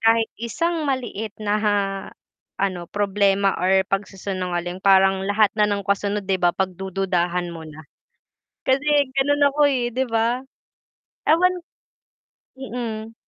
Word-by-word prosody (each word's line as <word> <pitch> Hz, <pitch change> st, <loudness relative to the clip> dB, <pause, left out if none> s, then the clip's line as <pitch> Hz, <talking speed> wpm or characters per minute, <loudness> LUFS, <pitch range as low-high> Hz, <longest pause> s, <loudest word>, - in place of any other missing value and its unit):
kahit 225 Hz, 0 st, +3 dB
isang 315 Hz, +6 st, -1 dB
maliit 225 Hz, -5 st, -3 dB
na 210 Hz, -1 st, -1 dB
ha, 210 Hz, -1 st, +2 dB, 0.8 s
ano, 185 Hz, -3 st, -2 dB
problema, 200 Hz, -1 st, +2 dB
or 190 Hz, +1 st, +3 dB
pag-si-sinungaling 185 Hz, -2 st, -3 dB
parang 195 Hz, 0 st, +4 dB
lahat 205 Hz, 0 st, +3 dB
na 210 Hz, -1 st, +2 dB
nung 200 Hz, -1 st, -2 dB
kasunod 200 Hz, +1 st, -1 dB
'di 190 Hz, -1 st, -1 dB
ba, 175 Hz, -1 st, +2 dB
pagdududahan 180 Hz, -2 st, -1 dB
mo 160 Hz, -1 st, -9 dB
na? 155 Hz, +1 st, -12 dB, 0.8 s
Kasi 265 Hz, +2 st, +1 dB, 0.3 s
gano'n 290 Hz, +2 st, +2 dB
ako, 285 Hz, +2 st, -7 dB
eh 245 Hz, -2 st, 0 dB
'di 255 Hz, +2 st, -1 dB
ba? 230 Hz, 0 st, +1 dB, 0.9 s
Ewan 360 Hz, +3 st, +3 dB, 0.9 s
Mm. 230 Hz, -3 st, -6 dB
205 Hz, 120 wpm, -22 LUFS, 190-235 Hz, 0.9 s, parang